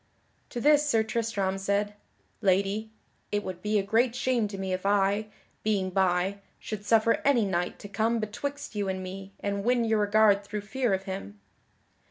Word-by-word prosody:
To 245 - -4
this 295 +2 +4
Sir 225 -5 +3
Tristram 215 -4 -1
said: 200 +1 0 0.5
"Lady, 200 +3 +1 0.4
it 205 0 0
would 180 -1 -6
be 210 +1 +1
a 200 - +2
great 230 +4 +2
shame 250 -4 +1
to 200 -1 -7
me 190 -1 -2
if 185 - -3
I, 200 +1 +2 0.3
being 195 -3 0
by, 190 +1 +1 0.2
should 215 -2 -6
suffer 225 +1 +3
any 255 -6 +4
knight 180 -2 -1
to - - -9
come 220 +3 0
betwixt 280 +7 -4
you 205 -2 -1
and 185 0 -3
me 195 +1 -8
and 200 0 -2
win 245 +1 +2
your 220 -1 +2
regard 205 -1 +4
through 205 +1 -5
fear 235 0 0
of 190 - -6
him." 190 - -6
205 Hz, 180 wpm, -28 LUFS, 195-225 Hz, 0.5 s, this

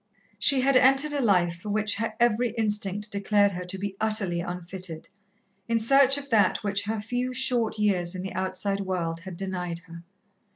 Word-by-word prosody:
She 275 -2 +4
had 270 +1 +2
entered 270 +3 +4
a 285 - 0
life 180 -7 +2
for 195 +4 -8
which 210 0 0
her 220 0 -3
every 240 0 +2
instinct 210 -1 -1
declared 200 0 +2
her 180 -1 -5
to 185 +2 -4
be 195 0 -4
utterly 210 -5 0
unfitted, 175 -1 -7 0.6
in 230 - +1
search 275 +4 +5
of 280 -1 -8
that 205 -3 +3
which 200 0 -1
her 220 +1 -2
few 245 +4 -3
short 245 -4 0
years 190 -4 0
in 185 - -5
the 190 - -6
outside 190 +1 -2
world 175 -4 -3
had 180 0 -9
denied 180 -3 -4
her. 170 0 -11
205 Hz, 180 wpm, -26 LUFS, 185-230 Hz, 0.6 s, search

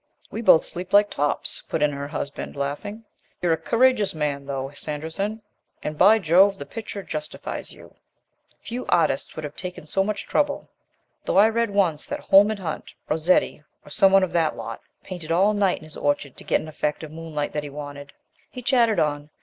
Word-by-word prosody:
"We 225 - -4
both 165 -8 +6
sleep 180 +2 -7
like 205 0 +6
tops," 145 0 -1
put 155 - 0
in 150 - +3
her 140 0 -5
husband, 145 -1 -5
laughing. 175 +11 -4 0.3
"You're 175 -2 +2
a - - 0
courageous 230 +3 +2
man, 145 -2 -2
though, 135 -1 -3
Sanderson, 160 +10 -3 0.4
and, 150 - -3
by 205 +8 +6
Jove, 195 +2 +4
the 140 - -7
picture 210 -1 -7
justifies 155 -3 -6
you. - - -15 0.7
Few 245 +2 -5
artist 165 -6 +1
would 155 - -6
have 150 - -8
taken 180 -4 -7
so 195 +5 +1
much 210 0 -3
trouble, 290 -1 0 0.6
though - - +1
I 210 +3 +7
read 230 0 0
once 185 -7 +1
that - - -3
Holman 205 +2 +5
Hunt, 170 -5 -5 0.2
Rossetti, 160 0 +2 0.2
or - - -13
some 195 +5 +5
one 195 0 +6
of 185 - -1
that 160 -2 +1
lot, - - -6 0.2
painted 175 -4 -7
all 195 +5 +4
night 200 -3 +2
in - - -13
his 155 -1 -9
orchard 145 -2 -1
to - - -11
get - - +1
an - - -9
effect 150 0 -2
of 155 - -8
moonlight 155 -2 -4
that 150 - -1
he 145 - -7
wanted." 145 0 -8 0.4
He 250 - -9
chattered 230 -6 +3
on. 145 -1 -1
165 Hz, 195 wpm, -24 LUFS, 150-205 Hz, 0.7 s, I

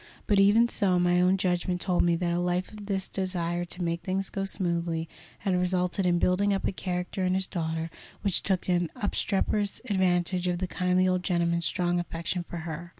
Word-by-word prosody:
But, 205 -2 +3
even 210 +4 +6
so, 195 -6 +2
my 175 0 +3
own 185 +2 +4
judgment 180 -1 0
told 180 -1 +1
me 170 -1 +3
that 170 0 -1
a 175 - 0
life 180 +1 -1
of 210 -2 -10
this 195 -2 -1
desire 175 -2 -2
to 180 +1 -5
make 170 0 -1
things 190 +1 -1
go 195 -1 -2
smoothly 170 -3 -1 0.3
had 195 -3 0
resulted 180 +1 +1
in 175 -1 +3
building 185 +4 +2
up 195 - -2
a - - 0
character 180 0 -3
in 185 0 +2
his 190 0 0
daughter 165 -2 -3 0.3
which 200 -3 +1
took 190 -2 0
an 175 -2 +1
obstreperous 205 0 -1
advantage 180 -1 +1
of 175 -1 0
the 185 - -2
kindly 180 +1 +1
old 185 0 +1
gentleman's 170 -2 +1
strong 175 -1 0
affection 175 +1 -3
for 175 0 -7
her. 170 +1 -6
180 Hz, 200 wpm, -28 LUFS, 175-190 Hz, 0.3 s, even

